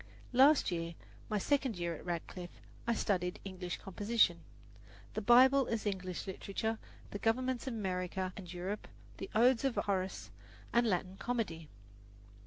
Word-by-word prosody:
Last 270 -1 +6
year, 170 -1 -3 0.3
my 215 - +1
second 265 0 +1
year 170 -1 -1
at 160 - -9
Radcliffe, 175 0 -5 0.3
I 235 - +3
studied 180 -4 0
English 185 -2 -4
composition, 205 -2 +2 0.7
the 215 - -2
Bible 260 +4 +6
as 225 -1 -2
English 185 -3 -3
composition, 200 +3 -3 0.3
the 205 - -4
governments 255 +3 0
of 250 - -2
America 185 -2 -2
and 180 -4 -8
Europe, 185 +4 -4 0.3
the 195 - -6
Odes 240 +2 +5
of 270 -3 +1
Horace, 190 -2 -1 0.4
and 235 0 +4
Latin 185 -1 -1
comedy. 190 -11 -2
200 Hz, 140 wpm, -34 LUFS, 180-235 Hz, 0.7 s, Last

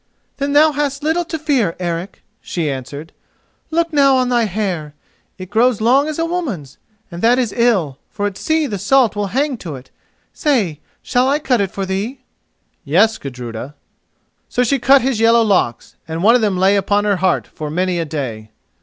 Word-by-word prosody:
"Then 280 +1 -2
thou 305 +2 +6
hast 290 -1 -2
little 320 +3 +1
to 320 - -4
fear, 270 - 0
Eric," 175 +1 -4 0.2
she 160 -5 -2
answered. 140 +4 -7 0.6
"Look 335 0 0
now 275 -2 +5
on 255 -1 +1
thy 240 -2 +2
hair: 180 -7 -3 0.4
it 185 0 -9
grows 230 +1 +3
long 260 +6 +3
as 310 - -4
a 330 - 0
woman's, 250 - -4 0.3
and 170 0 -7
that 235 +2 +4
is 245 -5 0
ill, 195 - +1
for 205 -1 -4
at 205 -2 -2
sea 315 +7 0
the 205 -8 -4
salt 245 +3 +3
will 205 -1 -1
hang 270 +5 -1
to 165 -9 -7
it. 130 0 -13 0.4
Say, 220 - 0 0.2
shall 250 +2 +1
I 285 - +2
cut 255 -7 +1
it 195 - -1
for 195 +1 -4
thee?" 205 +8 -3 0.6
"Yes, 200 +9 +2
Gudruda." 125 0 -7 0.7
So 250 - +1
she 270 +3 +1
cut 270 +2 +5
his 260 -4 0
yellow 230 +1 +5
locks, 185 - 0
and 165 +2 -4
one 225 +3 +6
of 250 - +3
them 205 -4 +1
lay 190 +2 +3
upon 205 +1 +1
her 200 -2 +2
heart 185 0 +1
for 155 -1 -7
many 180 +2 -1
a - - 0
day. 125 -8 -5
210 Hz, 190 wpm, -18 LUFS, 170-265 Hz, 0.7 s, thou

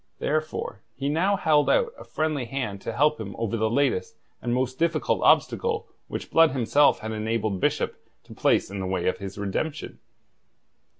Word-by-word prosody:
Therefore 155 -9 -2
he 140 +2 -2
now 180 +7 +2
held 150 -5 +3
out 475 -2 +2
a - - -11
friendly 155 -4 -2
hand 115 -6 -4
to - - -4
help 150 -2 +2
him 100 -2 -6
over 115 -1 -1
the 110 -1 +1
latest 135 -4 0 0.2
and 120 - -2
most 130 +1 -1
difficult 165 -1 +1
obstacle 455 -1 +2 0.2
which - - -6
Blood 165 -4 +5
himself 130 +3 +3
had 110 0 -4
enabled 110 -2 -1
Bishop - - -1 0.2
to - - -13
place - - +2
in 100 - -4
the 95 - -3
way 90 -2 -1
of 95 - 0
his 100 0 -7
redemption. 125 +10 -3
130 Hz, 175 wpm, -26 LUFS, 110-155 Hz, 0.2 s, Blood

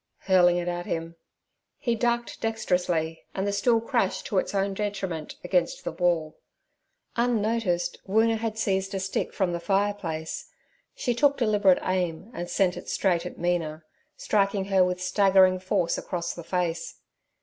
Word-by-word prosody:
'—hurling 180 -2 +4
it 175 0 -2
at 175 0 -3
him. 165 0 -3 0.6
He 235 - 0
ducked 235 +1 -1
dexterously, 180 -7 0
and 190 - -1
the 200 - 0
stool 230 +3 +3
crashed 230 -4 -1
to 195 - +1
its - - -3
own 195 0 +1
detriment 195 -6 -3
against 180 -1 0
the - - -3
wall. 170 -3 0 0.8
Unnoticed, 225 -6 0
Woona 225 +3 +3
had 225 -1 -3
seized 195 -2 0
a - - -1
stick 190 0 -2
from 185 -4 0
the 170 - -2
fire 200 +3 +1
place; 160 -5 -5 0.5
she 245 - 0
took 280 +3 +3
deliberate 205 -6 +4
aim, 185 +2 -2
and 175 0 -5
sent 185 -2 +1
it - - -8
straight 180 -3 +1
at - - -10
Mina, 165 -3 -1 0.3
striking 200 -1 +1
her 190 -1 +6
with 180 0 -1
staggering 190 0 +4
force 180 -2 0
across 175 -1 -3
the 170 - -8
face. 175 -1 -2
190 Hz, 160 wpm, -26 LUFS, 175-210 Hz, 0.8 s, her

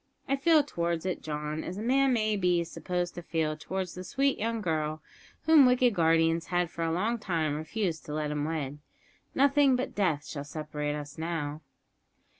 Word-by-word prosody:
I 275 - +2
feel 305 +2 +4
towards 170 - -2
it, 185 - -2
John, 150 0 -4
as 185 - -5
a - - -4
man 270 +3 +3
may 215 -3 +1
be 180 -3 +2
supposed 175 +1 -3
to 175 - -7
feel 160 -2 -1
towards 185 +3 -4
the 180 - -7
sweet, 275 +8 0
young 230 +1 -1
girl 155 -5 -2 0.4
whom 310 -5 +7
wicked 250 -1 +4
guardians 165 -1 +2
had 175 -2 0
for 170 - -4
a 165 - 0
long 215 +8 0
time 165 -7 -1
refused 160 +3 -3
to 150 - -5
let 150 -1 -1
him 150 -1 -1
wed. 150 -2 -3 0.6
Nothing 280 0 +4
but 255 +2 -2
death 165 -8 0
shall 140 -2 -5
separate 150 0 -4
us 145 +1 -7
now!" 160 -2 -3
170 Hz, 185 wpm, -29 LUFS, 155-220 Hz, 0.6 s, whom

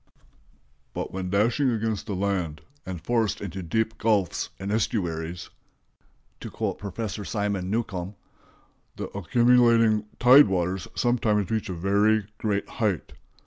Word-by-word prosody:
"But - - -4
when 95 -1 -3
dashing 115 +8 +2
against 110 -3 -2
the 100 - -2
land, 90 -5 -2 0.3
and 90 -2 -4
forced 115 +4 0
into 95 -1 -5
deep 110 +6 -1
gulfs 105 -5 +1
and 95 +1 -4
estuaries," 85 -6 -2 0.9
to - - -7
quote - - -3
Professor 105 +1 -5
Simon 100 -3 -2
Newcomb, 100 -3 -3 0.8
"the - - -7
accumulating 115 0 +4
tide 130 +4 +8
waters 95 0 -1
sometimes 110 -5 +1
reach 110 -3 -1
a - - -2
very 100 +4 +2
great 100 -2 -1
height. 105 -8 -2
105 Hz, 125 wpm, -26 LUFS, 95-110 Hz, 0.9 s, tide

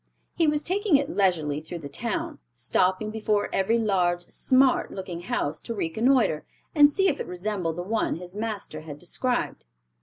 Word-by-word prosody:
He 330 -2 +2
was 300 0 +1
taking 390 -1 +2
it 285 +3 -3
leisurely 160 -7 +1
through 165 +2 -7
the 155 -4 -7
town, 310 - -3
stopping 185 - +1
before 215 -1 0
every 215 +5 +2
large 180 -5 +1
"smart" 260 +7 +2
looking 185 -3 -6
house 155 -3 -2
to 230 - -5
reconnoiter, 220 - +2 0.3
and 290 -2 +7
see 385 +6 +2
if - - 0
it - - -4
resembled 180 -2 -2
the 175 - -4
one 220 +4 0
his 180 +3 -9
master 210 -7 -4
had 155 -2 -8
described. 245 - -2
200 Hz, 170 wpm, -26 LUFS, 175-255 Hz, 0.3 s, and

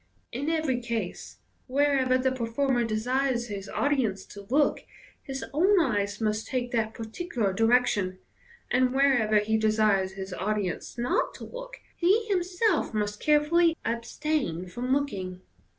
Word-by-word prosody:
In 280 +6 -2
every 310 -6 0
case, 230 -6 -4 0.3
wherever 270 -1 +2
the 260 0 +1
performer 245 +1 0
desires 240 +2 0
his 200 -1 -6
audience 245 -10 0
to 200 -1 -12
look, 285 +3 +3 0.4
his 270 -1 -5
own 375 +6 +4
eyes 205 -9 0
must 215 -1 -1
take 245 -2 -2
that 225 -2 -1
particular 225 - -2
direction; 225 -4 +2 0.5
and 255 +1 +2
wherever 245 -6 +4
he 215 +1 +2
desires 215 -3 +2
his 190 -1 -6
audience 200 +3 -3
not 240 +1 0
to - - -9
look, - - -8 0.2
he 395 +6 +3
himself 365 - 0
must 210 0 -1
carefully 320 +3 +3
abstain 235 - -2
from 245 +8 -4
looking. 195 -10 -1
245 Hz, 135 wpm, -27 LUFS, 215-285 Hz, 0.5 s, own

